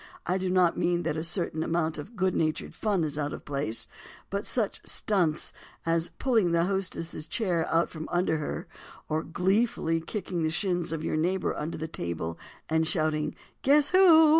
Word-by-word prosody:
I 185 +2 +1
do 185 0 -1
not 180 -2 +3
mean 175 0 +1
that - - -1
a 160 - -2
certain 170 -2 0
amount 160 -1 0
of 205 +11 -8
good 190 -2 +1
natured 155 -1 -1
fun 200 -6 +1
is 150 -1 -2
out 145 0 -1
of - - -8
place, 140 -6 -1 0.4
but 200 +1 -2
such 220 -5 -1
"stunts" 175 -7 0 0.3
as 165 0 +1
pulling 225 -10 +2
the 170 0 +4
hostess' 180 -4 -2
chair 175 -7 0
out 165 +1 +3
from 160 -1 -7
under 175 -2 +2
her—or 155 +1 -5
gleefully 180 -1 +1
kicking 180 0 -3
the 160 - +2
shins 175 -1 0
of 160 -1 -3
your 155 - 0
neighbor 180 +4 +1
under 155 +3 -3
the 160 - -3
table 85 - -4 0.3
and 160 0 +2
shouting 155 -3 +1 0.3
"Guess 285 +1 +4
who?" 335 -4 +8
170 Hz, 175 wpm, -28 LUFS, 155-190 Hz, 0.4 s, who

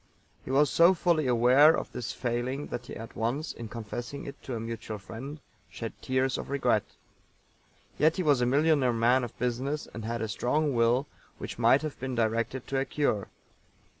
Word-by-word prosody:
He - - -10
was 140 0 +3
so 170 +7 +6
fully 165 -4 +1
aware 125 +6 +6
of - - -5
this 125 -2 -4
failing 125 +3 -2
that 120 0 -5
he - - -7
at 115 0 -9
once, 130 +8 -2
in 115 - -7
confessing 120 +5 -6
it 140 - -9
to 130 - -5
a - - -3
mutual 115 -1 -5
friend, 120 +9 -8 0.3
shed - - -6
tears 130 0 0
of - - -7
regret. 125 -6 +2 1.2
Yet 155 +2 +4
he 185 - -1
was 145 -5 +3
a 125 - +2
millionaire 140 -2 +3
man 120 +3 +3
of 120 - -7
business, 130 +5 -2
and 115 - -6
had 115 +1 -3
a - - -1
strong 145 +7 0
will 120 +3 +3 0.3
which - - -7
might 120 +5 +5
have 155 -2 -5
been 130 -1 -3
directed 115 +2 -1
to 135 - 0
a 135 - 0
cure. 140 -10 0
125 Hz, 190 wpm, -29 LUFS, 115-140 Hz, 1.2 s, so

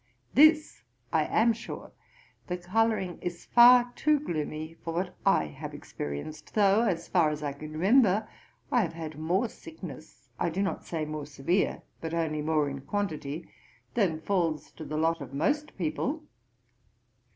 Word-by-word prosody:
This 310 +3 +5 0.3
I - - +3
am 230 +1 +3
sure, 230 - -8 0.6
the 180 - -2
colouring 190 0 0
is 175 -1 -5
far 245 0 +7
too 305 -1 +3
gloomy 155 - -4
for 165 -1 -4
what 180 +1 -2
I 195 - +5
have 75 - -8
experienced, 75 - -7
though 205 0 +5
as 180 -6 -1
far 170 -4 +3
as 150 0 -4
I 145 -1 -2
can 155 +2 -9
remember, 205 +4 +4 0.4
I 245 - +4
have 175 - -2
had 155 -2 -7
more 180 +9 +1
sickness 160 -7 -11
(I - - +1
do 190 +5 -1
not 195 - -3
say 160 -2 -2
more 150 -1 -5
severe, 150 +7 0 0.2
but 165 0 -3
only 155 -2 -1
more 155 -1 +1
in 140 -1 -5
quantity,) 160 -3 -3 0.5
than 175 -8 +1
falls 170 -5 0
to 155 - -9
the 155 - -4
lot 165 +1 +1
of 135 0 -7
most 295 - 0
people. 255 - -2
170 Hz, 160 wpm, -29 LUFS, 155-205 Hz, 0.6 s, far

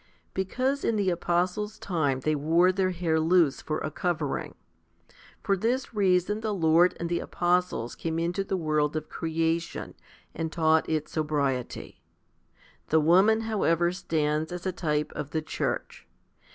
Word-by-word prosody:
Because 255 +9 -1
in 230 - +1
the 200 -3 +1
apostles' 180 +5 -1
time 145 -10 -1
they 155 +3 +1
wore 165 +5 +3
their 185 0 +1
hair 170 -3 0
loose 165 -3 +3
for 155 - -2
a 155 - -4
covering. 160 -3 -2 0.9
For 195 - +2
this 240 +7 -1
reason 195 0 +2
the 215 -2 -1
Lord 170 +1 +4
and 170 - -2
the 170 0 -1
apostles 175 -9 0
came 160 -1 -3
into 175 +4 -1
the 195 0 -2
world 155 -2 0
of 155 0 -4
creation, 165 0 -2 0.4
and 160 -1 -3
taught 160 -1 +2
it 155 -1 -1
sobriety. 140 -5 -2 0.9
The 160 - +4
woman, 190 +8 +4
however, 175 -6 +1
stands 155 -3 -1
as 180 +1 -6
a 185 - 0
type 150 -4 -1
of 150 -2 -5
the 160 +1 -2
church. - - -4
170 Hz, 150 wpm, -27 LUFS, 155-185 Hz, 0.9 s, Lord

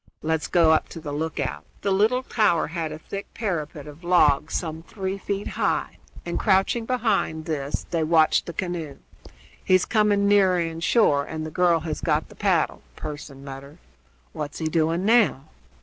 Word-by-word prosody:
Let's 160 0 0
go 165 -2 +4
up 160 - +2
to 165 - -8
the 155 -2 -6
lookout." 145 -3 -3 0.2
The 200 - +1
little 220 +7 +2
tower 215 -9 +2
had 160 -1 -4
a 155 - -6
thick 195 +5 -7
parapet 155 -9 -3
of 150 +3 -12
logs 155 -4 +3
some 160 -1 -3
three 190 +2 -5
feet 200 +1 -3
high, - - -1 0.3
and, - - -2
crouching 205 +3 +2
behind 215 -10 0
this, 145 -3 -3
they 165 -2 +1
watched 160 0 +3
the 170 - -5
canoe. 165 -5 -4 0.7
"He's 185 -1 +3
coming 210 -2 +2
nearer 195 -3 +4
in 165 -1 -3
shore, 165 -6 +3
and 160 0 -5
the 155 - -6
girl 170 -1 +3
has 155 -1 -4
got 155 -1 0
the - - -14
paddle," 190 -6 +1
Pearson 145 -2 -8
muttered. 140 +2 -9 0.6
"What's 145 -1 -5
he 160 - -3
doing 165 +3 +1
now?" 215 - +4
165 Hz, 170 wpm, -24 LUFS, 155-195 Hz, 0.7 s, go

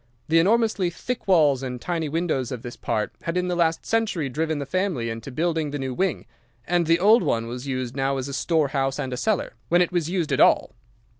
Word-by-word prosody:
The 165 +1 +5
enormously 210 0 +2
thick 235 +8 -5
walls 150 -8 +4
and 125 -2 -5
tiny 165 +1 -2
windows 155 -6 -1
of 125 -3 -5
this 120 - -7
part 105 -1 -2
had 165 +1 -2
in 180 0 0
the 180 - 0
last 165 -1 +1
century 220 -10 0
driven 155 +4 -1
the 140 - -3
family 165 - -1
into 115 +3 -7
building 160 +1 -1
the 145 - -4
new 135 -2 -3
wing, 185 +4 -1 0.4
and 175 -1 +1
the 165 +1 +5
old 215 +6 +6
one 115 0 0
was 125 +3 -6
used 130 -2 -3
now 135 0 0
as 130 0 -3
a 140 - -6
storehouse 140 -4 0
and 130 - -3
a - - -3
cellar, 210 - -1 0.2
when 175 - +4
it 175 - -4
was 170 -3 -1
used 175 -4 -1
at - - +1
all. - - +4
160 Hz, 225 wpm, -24 LUFS, 135-175 Hz, 0.4 s, old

